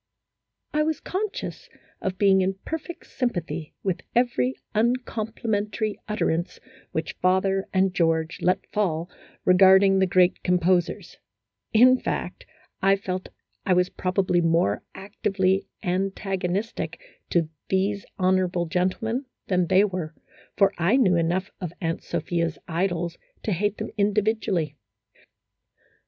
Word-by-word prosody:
I 305 - +2
was 310 -1 0
conscious 425 +6 -4 0.3
of 190 -1 -2
being 195 -2 +5
in 190 +1 0
perfect 325 +2 -5
sympathy 175 - -3
with 190 -3 -1
every 185 - +2 0.2
uncomplimentary 220 -2 -1
utterance 175 -5 -1 0.3
which 160 0 -3
father 190 +1 +2
and 190 -1 +2
George 165 -2 0
let 180 - +1
fall 175 -4 -1 0.3
regarding 190 +1 +6
the 190 - +3
great 180 0 +3
composers; 180 0 +1 0.5
in 255 +3 +6
fact, - - -4 0.3
I 195 +1 +5
felt 185 -1 -4 0.3
I 190 - +2
was 180 0 +3
probably 185 -1 +1
more 165 -11 +2
actively 195 -1 0 0.2
antagonistic 190 -1 -2 0.3
to 165 -3 +1 0.2
these 195 +1 +1
honorable 185 -2 +2
gentlemen 190 - -1 0.2
than 180 -2 +2
they 190 +2 +5
were, 180 -6 -3 0.4
for 195 -2 +4
I 175 +8 +3
knew 195 -9 +4
enough 175 +3 0
of 175 -3 -4
Aunt 165 -1 -2
Sophia's 170 -2 -2
idols 170 0 -1 0.2
to 215 - -1
hate 205 +3 0
them - - -5
individually. 200 -6 +1
190 Hz, 115 wpm, -25 LUFS, 175-205 Hz, 0.5 s, regarding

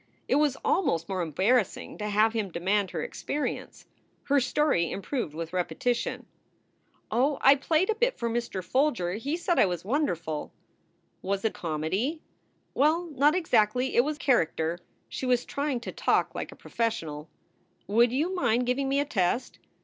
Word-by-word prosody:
It 265 - +3
was 295 -3 +2
almost 170 - +1
more 190 -2 -2
embarrassing 190 - 0
to 210 0 -2
have 215 +2 +3
him 215 -4 -1
demand 190 +3 0
her 165 -4 -3
experience. 295 0 -4 0.4
Her 285 0 +3
story 260 - +1
improved 200 - -3
with 165 +1 -5
repetition: 240 +7 -1 0.9
"Oh, 265 +6 +2
I 270 - +8
played 315 +7 +1
a - - +2
bit 485 +3 0
for 235 - -2
Mr. 230 -5 -2
Folger. 245 -8 +1
He 275 - -2
said 345 0 0
I - - +6
was 175 -1 -4
won 290 +7 +1
derful." 160 -3 -4 0.7
"Was 195 +2 -2
it 220 - +1
comedy?" 185 - -2 0.5
"Well, 320 +4 +2
not 290 +3 +3
exactly. 250 - +2
It 240 - +6
was 300 +2 -2
character." 170 - +1 0.3
She 260 - -4
was 250 -1 +2
trying 280 -3 -2
to - - -6
talk - - +1
like - - -5
a - - -12
professional. 160 -10 -3 0.6
"Would 230 +3 +3
you 310 +9 0
mind 250 -9 +1
giving 270 +2 0
me 275 +1 +2
a 285 - +1
test?" 235 0 -1
240 Hz, 165 wpm, -28 LUFS, 185-285 Hz, 0.9 s, I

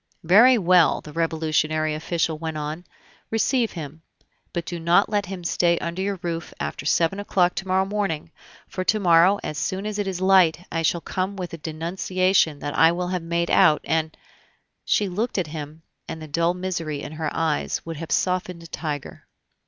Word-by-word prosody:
"Very 225 +9 +6
well," 180 -4 +4
the 150 - -11
Revolutionary 155 -1 0
official 160 0 -1
went 160 -1 -4
on, 155 +4 -5 0.4
"receive 225 +1 +1
him; 160 -1 -8 0.5
but 170 -1 -3
do 175 - -5
not 170 +1 +3
let 205 -1 0
him 185 -2 -6
stay 170 0 +2
under 170 +3 -4
your 200 0 -1
roof 170 -1 -4
after 75 - -4
seven 170 +5 +2
o'clock 180 -3 +1
to 190 - -5
morrow 190 +1 +2
morning; 195 -6 -2 0.4
for 185 - -4
to 215 +3 +2
morrow, 180 +1 +5
as 150 - -4
soon 190 +2 -2
as 210 -1 -3
it 205 - -1
is 185 -2 -3
light, 185 -3 +4
I 165 - -1
shall 165 +1 +1
come 190 +4 -3
with 180 -3 -6
a - - -5
denunciation 170 +1 0
that 145 - -4
I 165 0 +6
will 180 +1 -3
have 180 -1 -2
made 170 +1 -1
out, 150 - +5
and 160 -1 -1 0.3
" - - -38 0.3
She 205 - +2
looked 210 +7 -2
at 185 - +1
him, 155 +1 -7 0.2
and 160 - -6
the 155 - -8
dull 170 +4 +1
misery 165 -5 -3
in - - -7
her 155 -1 -3
eyes 160 -2 -1
would 165 -2 -6
have 165 +1 -7
softened 180 -2 -1
a - - -10
tiger. 150 -3 -6
170 Hz, 190 wpm, -23 LUFS, 160-185 Hz, 0.5 s, Very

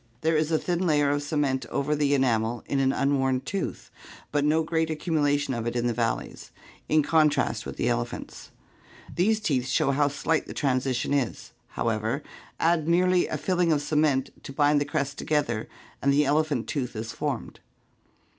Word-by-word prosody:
There 160 +1 +2
is 155 +1 +1
a 160 - +3
thin 175 +2 -1
layer 145 -2 +3
of 145 0 0
cement 145 -4 -1
over 145 +5 -1
the 145 -1 +2
enamel 120 -3 +1
in 140 - -1
an 135 0 +3
unworn 135 -2 +1
tooth, 195 +4 -4 0.4
but 145 -1 +1
no 155 +2 +3
great 160 0 0
accumulation 145 -3 0
of 115 -1 -3
it 120 - -3
in 120 0 0
the 120 - +1
valleys, 115 -1 -3 0.4
in 155 -1 +4
contrast 155 -1 +2
with - - -7
the - - 0
ele - - +1
phants. - - -9 0.7
These 215 +5 +2
teeth 135 -12 0
show 135 - +2
how 145 +1 +2
slight 145 +3 -1
the - - -8
transition 130 -1 0
is, 135 -5 -2 0.3
however; 115 +5 -1 0.4
add 165 -2 +2
merely 180 +1 +3
a 155 - -3
filling 175 +3 +1
of 150 - +3
cement 145 -2 +1
to - - -7
bind 145 +1 +3
the - - 0
crests 140 -3 -2
together 140 -7 -1 0.3
and 140 - +3
the 145 +1 +3
elephant 145 -3 +1
tooth 125 -4 -3
is 110 +1 -4
formed. - - -4
145 Hz, 180 wpm, -26 LUFS, 130-155 Hz, 0.7 s, in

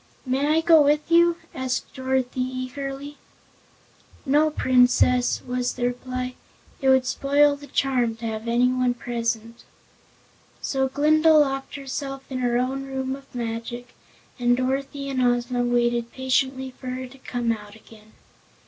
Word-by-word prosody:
"May 265 +3 0
I 315 +2 +3
go 325 -1 +6
with 295 +2 +2
you?" 340 0 +5 0.2
asked 260 -1 -3
Dorothy, 260 -1 -1
eagerly. 270 +3 -5 1.1
"No, 295 +3 +3
Princess," 250 -3 +3
was 250 0 -1
the 245 - -2
reply. 255 +1 -3 0.5
"It 265 - +3
would 260 -1 +5
spoil 285 +2 +3
the 285 0 -12
charm 255 -4 0
to 230 +1 -8
have 220 0 -4
anyone 250 +1 +2
present." 230 -1 -3 1.0
So 265 -1 0
Glinda 310 +3 +4
locked 270 -2 +1
herself 275 0 -5
in 255 - -2
her 240 -1 +1
own 265 +2 -1
Room 265 0 -3
of 275 -1 -16
Magic 240 +1 -5 0.5
and 245 0 +3
Dorothy 275 +2 -2
and 265 -2 -1
Ozma 245 0 +1
waited 240 -1 +1
patiently 260 0 -1
for 255 0 -12
her 255 +1 -4
to 255 +2 -14
come 240 -2 -2
out 210 -2 -6
again. 220 0 -18
255 Hz, 140 wpm, -24 LUFS, 245-275 Hz, 1.1 s, go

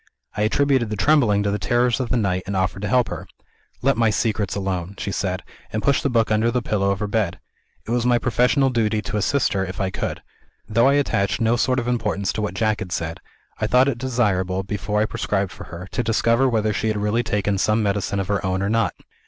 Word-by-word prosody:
I 105 - -2
attributed 130 +2 +2
the 105 - -2
trembling 105 -4 +3
to 100 - 0
the 105 - -1
terrors 120 0 +1
of 125 -3 -2
the 125 - +1
night, 95 -4 0
and 100 - -2
offered 95 +1 -1
to 105 - -2
help 125 +3 +2
her. - - -6 0.6
'Let 135 -1 +3
my 115 -1 +3
secrets 105 -2 -1
alone,' 95 -1 -3
she 100 - -3
said 95 -2 -2 0.3
and 110 - -2
pushed 140 -1 +3
the 140 - 0
book 115 -3 +1
under 110 +2 +3
the 125 0 -1
pillow 100 -3 0
of 100 +1 -1
her 105 - -1
bed. 100 -4 -1 0.5
It 110 - -5
was 120 0 +1
my 120 0 +3
professional 125 +3 +2
duty 110 -3 0
to 105 - -3
assist 130 +7 +1
her, 95 -1 0
if 90 0 -6
I 95 -1 -1
could. - - -4 0.4
Though 115 +4 +3
I 140 - +4
attached 105 -8 +1
no 115 0 +2
sort 130 +2 +1
of 120 -1 -1
importance 105 -5 -1
to 110 - -3
what 105 - -3
Jack 110 -2 +1
had 90 - -6
said, 85 -1 -3 0.4
I - - 0
thought 125 +2 +4
it 125 -4 -1
desirable, 100 -7 0
before 105 +1 -2
I - - +3
prescribed 100 -3 -2
for - - -10
her, 85 +2 -8
to - - -1
discover 115 +3 +2
whether 110 -2 +1
she 110 - -1
had 110 -1 0
really 105 +3 +1
taken 105 -3 -1
some 110 +2 +2
medicine 100 0 -1
of 95 - -2
her 100 -1 0
own 95 0 -1
or 100 - 0
not. 115 -1 +1
105 Hz, 240 wpm, -22 LUFS, 100-120 Hz, 0.6 s, I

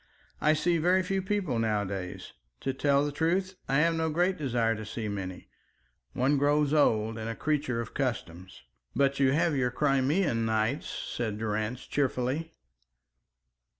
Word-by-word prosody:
"I 155 - +4
see 165 +2 +1
very 180 +3 +3
few 195 +1 -1
people 190 - -1
nowadays. 100 -4 -2 0.3
To 135 - -1
tell 140 +1 +2
the 145 - -2
truth 180 +5 0 0.2
I 135 +2 +3
have 165 +1 +3
no 160 0 0
great 175 +4 +1
desire 120 -7 0
to 110 - -6
see 110 +1 -5
many. 95 -3 -5 0.7
One 135 +3 +2
grows 145 +1 +2
old 110 -6 +2
and 110 +1 -4
a 115 - -3
creature 145 -5 -1
of 115 - -8
customs." 95 - -4 0.3
"But 140 0 +2
you 135 -1 +4
have 165 0 +2
your 125 -2 +1
Crimean 135 0 +1
nights," 110 +4 0
said 110 -3 -3
Durrance, 110 +3 -2
cheerfully. 140 +4 -1
135 Hz, 150 wpm, -29 LUFS, 115-155 Hz, 0.7 s, I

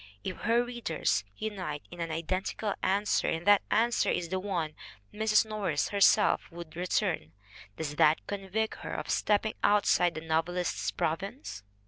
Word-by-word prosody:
If 185 - -4
her 235 +1 +2
readers 230 - -1
unite 185 -9 -4
in 175 -1 -8
an 165 - -2
identical 185 +5 -2
answer 200 +2 +1
and 165 +1 -1
that 205 -1 +6
answer 235 +2 +2
is 170 -1 -1
the 185 +1 -1
one 175 -6 -2 0.4
Mrs. 215 0 +3
Norris 200 -9 -1
herself 200 -1 +4
would 170 -2 -10
return, 175 - -1 0.4
does 150 -2 -4
that 155 +1 +4
convict 205 +2 -2
her - - -5
of - - -3
stepping 215 +1 +1
outside 180 -4 +3
the 160 - -4
novelist's 165 +2 -1
province 195 - -3
185 Hz, 145 wpm, -30 LUFS, 165-210 Hz, 0.4 s, that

